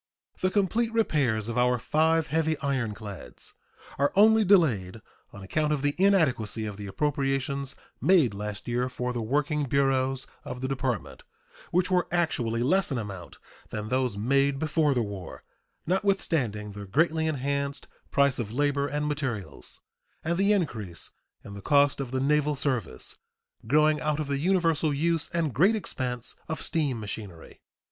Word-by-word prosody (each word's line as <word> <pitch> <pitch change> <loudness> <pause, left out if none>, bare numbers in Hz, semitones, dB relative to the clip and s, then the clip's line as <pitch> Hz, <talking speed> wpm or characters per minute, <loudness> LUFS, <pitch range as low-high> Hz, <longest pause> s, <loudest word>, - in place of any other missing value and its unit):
The 185 - +2
complete 215 +4 +1
repairs 140 - +1
of 120 +1 -1
our 125 0 +3
five 160 +5 +2
heavy 160 -1 +2
ironclads 110 - -4 0.5
are 140 +1 +3
only 220 +2 +6
delayed 125 - +3 0.3
on 100 - -10
account 150 +10 0
of 145 -2 0
the 145 0 +2
inadequacy 130 - +2
of 105 -2 -5
the 100 -1 -7
appropriations 140 +2 -1 0.3
made 165 - +4
last 105 +1 -6
year 125 +1 0
for 125 -1 -3
the 120 - -2
working 145 +5 0
bureaus 135 -1 +1 0.2
of 125 0 -6
the 130 - -1
Department, 130 -4 -3 0.5
which 180 +2 +1
were 180 -1 +2
actually 120 -10 0
less 185 +6 +2
in 135 - 0
amount 100 -6 -7 0.3
than 105 -1 -5
those 125 -4 0
made 135 +5 +2
before 155 -1 +1
the 120 - +2
war, 100 -5 -7 0.4
notwithstanding 160 - 0
the 100 0 -8
greatly 160 - +2
enhanced 140 -1 -2 0.2
price 140 -2 +3
of 110 -3 -3
labor 140 +2 +1
and 150 +1 -2
materials 135 -9 -4 0.4
and 170 +2 0
the 200 +1 +4
increase 110 - -2 0.3
in 100 - -8
the 100 - -8
cost 145 +4 +3
of 135 -3 -3
the 130 +1 -1
naval 150 +2 +2
service 125 - -3 0.5
growing 150 +3 +4
out 150 0 0
of 155 - -1
the 140 -1 -2
universal 165 -2 +2
use 160 +2 0
and 165 -5 -1
great 190 - +4
expense 125 - -4
of 160 - -2
steam 145 -7 0
machinery. 100 -5 -8
140 Hz, 155 wpm, -27 LUFS, 115-155 Hz, 0.5 s, only